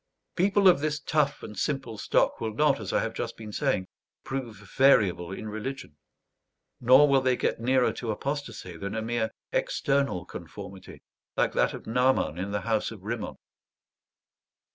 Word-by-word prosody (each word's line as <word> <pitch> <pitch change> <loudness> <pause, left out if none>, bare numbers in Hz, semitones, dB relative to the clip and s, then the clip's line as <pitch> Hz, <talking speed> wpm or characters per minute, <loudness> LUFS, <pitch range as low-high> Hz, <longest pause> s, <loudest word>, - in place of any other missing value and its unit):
People 195 +2 +4
of 180 -6 +7
this 150 0 -1
tough 150 -1 0
and 105 - -8
simple 130 +1 -2
stock 105 - +1
will 110 -2 -3
not, 145 -1 +3
as 105 -4 -5
I - - +2
have 115 - -3
just 115 -1 -4
been 110 -1 -8
saying, 120 -6 0 0.4
prove 130 -4 -4 0.2
variable 95 -10 +4
in 110 +3 -6
religion; 110 - -6 0.8
nor 130 +4 +7
will 135 -1 +4
they 130 -1 +2
get - - -1
nearer 125 +2 +2
to 120 - -5
apostasy 115 - -4
than 100 +5 -5
a 110 - -2
mere 115 -1 -1 0.2
external 140 - 0
conformity 95 +2 -10 0.3
like - - +2
that - - +2
of - - -10
Naaman 125 -8 +1
in 95 +2 -3
the 100 0 -2
house 110 +2 0
of 105 -5 -11
Rimmon. 110 +1 -4
115 Hz, 165 wpm, -27 LUFS, 105-140 Hz, 0.8 s, of